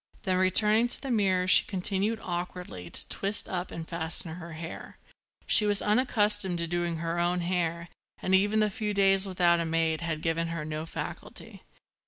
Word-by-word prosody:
Then 185 Hz, -2 st, 0 dB
returning 210 Hz, +5 st, +4 dB
to -, -, +1 dB
the 270 Hz, -, -5 dB
mirror 190 Hz, -5 st, +2 dB
she -, -, +7 dB
continued, 200 Hz, +3 st, -1 dB
awkwardly, 175 Hz, -, -6 dB
to -, -, -1 dB
twist 200 Hz, +1 st, +1 dB
up 180 Hz, 0 st, -4 dB
and 165 Hz, -1 st, -7 dB
fasten 165 Hz, -1 st, -1 dB
her 170 Hz, -2 st, -9 dB
hair. 165 Hz, +1 st, -9 dB, 0.5 s
She 210 Hz, -, +5 dB
was 205 Hz, -1 st, +4 dB
unaccustomed 210 Hz, -5 st, +1 dB
to 170 Hz, -, -2 dB
doing 175 Hz, 0 st, -2 dB
her 165 Hz, +1 st, -3 dB
own 175 Hz, +1 st, 0 dB
hair 170 Hz, -1 st, -2 dB, 0.3 s
and 185 Hz, -, -2 dB
even 205 Hz, +3 st, +3 dB
the 210 Hz, -1 st, +1 dB
few 210 Hz, +1 st, -3 dB
days 195 Hz, 0 st, +4 dB
without 175 Hz, -2 st, +2 dB
a 170 Hz, -, -1 dB
maid 160 Hz, 0 st, 0 dB
had 165 Hz, -2 st, -4 dB
given 165 Hz, 0 st, -1 dB
her 165 Hz, -2 st, -5 dB
no 155 Hz, +1 st, -5 dB
facility. -, -, -7 dB
180 Hz, 180 wpm, -28 LUFS, 165-200 Hz, 0.5 s, she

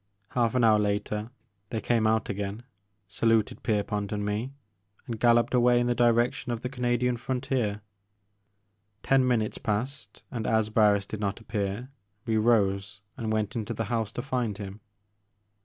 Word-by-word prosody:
Half 120 Hz, -1 st, +1 dB
an 125 Hz, -, +3 dB
hour 110 Hz, -2 st, +6 dB
later 105 Hz, +1 st, -1 dB, 0.4 s
they 110 Hz, -, -2 dB
came 115 Hz, -1 st, +2 dB
out 110 Hz, 0 st, +2 dB
again, 100 Hz, +3 st, -4 dB, 0.4 s
saluted 115 Hz, +1 st, +1 dB
Pierpont 105 Hz, -1 st, -1 dB
and 105 Hz, -1 st, -2 dB
me, 105 Hz, +5 st, -2 dB, 0.5 s
and 115 Hz, -4 st, -5 dB
galloped 120 Hz, +1 st, +4 dB
away 120 Hz, 0 st, +5 dB
in 120 Hz, -, +1 dB
the 120 Hz, -, +2 dB
direc 120 Hz, +1 st, +3 dB
tion 130 Hz, -, -6 dB
of 115 Hz, -1 st, -3 dB
the 125 Hz, -, -3 dB
Canadian 125 Hz, -1 st, 0 dB
frontier. 125 Hz, -4 st, -1 dB, 1.2 s
Ten 135 Hz, -1 st, +3 dB
minutes 115 Hz, -4 st, 0 dB
passed, 125 Hz, +7 st, -3 dB
and, 115 Hz, -4 st, -3 dB
as 110 Hz, -1 st, +2 dB
Barris 105 Hz, -2 st, +4 dB
did 105 Hz, -, -6 dB
not 100 Hz, 0 st, -2 dB
appear, 105 Hz, +2 st, -3 dB, 0.4 s
we 115 Hz, -2 st, 0 dB
rose 100 Hz, -4 st, +2 dB
and 110 Hz, -3 st, -3 dB
went 110 Hz, -1 st, -1 dB
into 110 Hz, -3 st, -3 dB
the 115 Hz, -, -2 dB
house, 110 Hz, -3 st, 0 dB
to 120 Hz, -, -4 dB
find 125 Hz, -6 st, -1 dB
him. 100 Hz, 0 st, -8 dB
110 Hz, 160 wpm, -28 LUFS, 105-120 Hz, 1.2 s, hour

